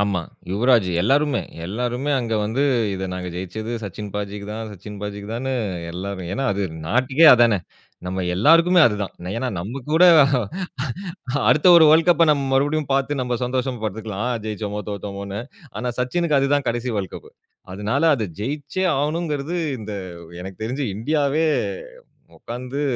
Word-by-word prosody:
ஆமா. 100 -3 +1 0.3
யுவராஜூ, 115 0 +3
எல்லாருமே 140 +6 +2 0.2
எல்லோருமே. 125 +8 -2
அங்க 115 -2 -2
வந்து 115 +7 0 0.3
இத 95 0 -3
நாங்க 90 0 -4
ஜெயிச்சது 100 +6 -5
சச்சின் 105 +1 -6
பாஜிக்கு 100 0 -4
தான், 110 0 -5
சச்சின் 105 +2 -10
பாஜிக்கு 105 0 -6
தானு 130 +3 -2 0.4
எல்லாரும் 95 0 -5
ஏன்னா 135 +7 -2
அது 100 +1 -2 0.2
நாட்டுக்கே 130 - +4
அதானே! 115 -4 +4 0.5
நம்ம 95 0 -2
எல்லாருக்குமே 165 - +5
அதுதான். 105 -3 -2 0.2
ஏன்னா 125 +2 -1
நம்மகூட 135 - -1 1.5
அடுத்த 150 - +4
ஒரு 160 - +8
வேர்ல்ட் 165 +2 +5
கப்ப 170 -1 +5
நம்ம 140 -2 -1
மறுபடியும் 145 +1 +1
பார்த்து, 135 +1 0
நம்ம 125 -1 -1
சந்தோஷம் 125 -1 -2
பட்ருக்கலாம். 110 +1 -3 0.2
ஜெயிச்சோமோ! 105 -1 -4
தோத்தோமோன்னு. 100 0 -5 0.4
ஆனா, 125 0 -2
சச்சினுக்கு 150 +4 +1
அதுதான் 140 0 +1
கடைசி 120 +1 -2
வேர்ல்ட் 95 -3 -3
கப்பு. - - -10 0.4
அதுனால 105 +8 -1
அத 110 -4 -2
ஜெயிச்சே 145 - -3
ஆவணுங்கிறது, 155 +1 -2 0.2
இந்த 105 -1 -7 0.5
எனக்குத் 95 +3 -8
தெரிஞ்சு 130 +4 -2
இந்தியாவே 150 +5 +1 0.9
உட்கார்ந்து 125 +4 -5
120 Hz, 135 wpm, -22 LUFS, 100-140 Hz, 1.5 s, ஒரு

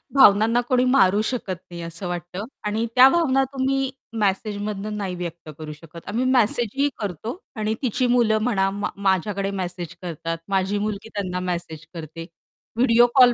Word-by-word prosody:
भावनांना 230 -1 +6
कोणी 250 -1 +3
मारू 210 -6 +4
शकत 215 -7 -2
नाही 170 -1 -7
असं 165 +2 -6
वाटतं 175 +3 -4 0.2
आणि 220 +2 0
त्या 255 +1 +9
भावना 270 -5 +3
तुम्ही 270 0 0 0.3
मेसेजमधनं 205 +1 -1
नाही 190 -3 -3
व्यक्त 170 -2 -6
करू 155 -1 -6
शकत. 165 +2 -12
आम्ही 235 +5 0
मेसेजही 250 +2 +2
करतो 210 - -4 0.2
आणि 215 0 -1
तिची 250 0 +1
मुलं 235 -3 +3
म्हणा 195 -5 +2
म 205 - -3 0.2
माझ्याकडे 195 +1 +1
मेसेज 180 -3 -5
करतात, 165 -1 -4
माझी 195 +1 +1
मुलगी 210 +1 -3
त्यांना 185 -3 -2
मेसेज 170 -4 -4
करते, 165 0 -7 0.5
व्हिडिओ 240 0 +5
कॉल 250 -2 +8
205 Hz, 155 wpm, -23 LUFS, 180-240 Hz, 0.5 s, त्या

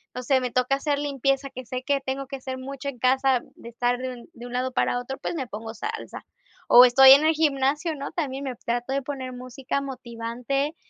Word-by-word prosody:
no 250 - -5
sé, 260 +1 +3
me 250 - -2
toca 255 +2 +2
hacer 285 +1 -1
limpieza, 275 -1 -1
que 255 - -8
sé 255 +1 -5
que 280 0 0
tengo 270 +1 -4
que 275 +1 -6
hacer 260 0 -6
mucho 275 +1 -6
en 255 - -8
casa, 260 +1 +2
de 235 - -11
estar 245 +1 -1
de 260 0 -3
un 240 +3 -13
de 240 0 -10
un 245 - -9
lado 255 +1 -1
para 250 -1 +1
otro, 265 +2 -6
pues - - -4
me 275 -5 -3
pongo 225 +1 -7
salsa. 440 - -6 0.4
O 245 - +10
estoy 265 +2 +8
en 280 +3 +8
el 320 - +4
gimnasio, 300 +1 +1
¿no? 280 -1 -6
También 280 -5 -3
me 260 -2 -4
trato 240 +2 -3
de 275 +1 0
poner 265 -2 -5
música 255 +2 -4
motivante, 250 +2 -3
265 Hz, 225 wpm, -25 LUFS, 250-275 Hz, 0.4 s, O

